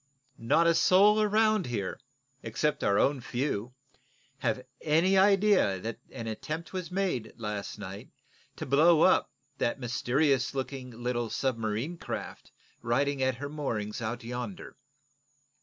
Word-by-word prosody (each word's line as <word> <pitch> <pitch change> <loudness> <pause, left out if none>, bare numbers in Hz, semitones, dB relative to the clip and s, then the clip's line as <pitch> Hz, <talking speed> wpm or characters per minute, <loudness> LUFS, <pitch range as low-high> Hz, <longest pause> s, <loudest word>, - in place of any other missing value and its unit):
Not 120 +9 +3
a 170 - +5
soul 205 +5 +5
around 215 -2 +2
here, 105 -6 -3 0.4
except 130 +7 -1
our 100 0 +3
own 140 +2 +2
few, 125 -2 -3 0.6
have 125 0 -1 0.2
any 165 +5 +3
idea 195 - +4
that 115 +3 -5
an 115 - -7
attempt 155 - -5
was 185 -2 -4
made, 180 - -2
last 105 -3 -5
night, - - -8 0.5
to - - -6
blow 155 +4 +5
up 185 - +4 0.3
that 120 - 0
mysterious 130 +2 +1
looking 130 -1 -4
little 120 0 -3
submarine 120 +6 -2
craft - - -6 0.3
riding 140 +4 0
at 130 -1 +1
her 145 +4 -5
moorings 120 -8 -4
out 120 +2 -4
yonder." 120 -4 -6
130 Hz, 130 wpm, -29 LUFS, 115-165 Hz, 0.6 s, a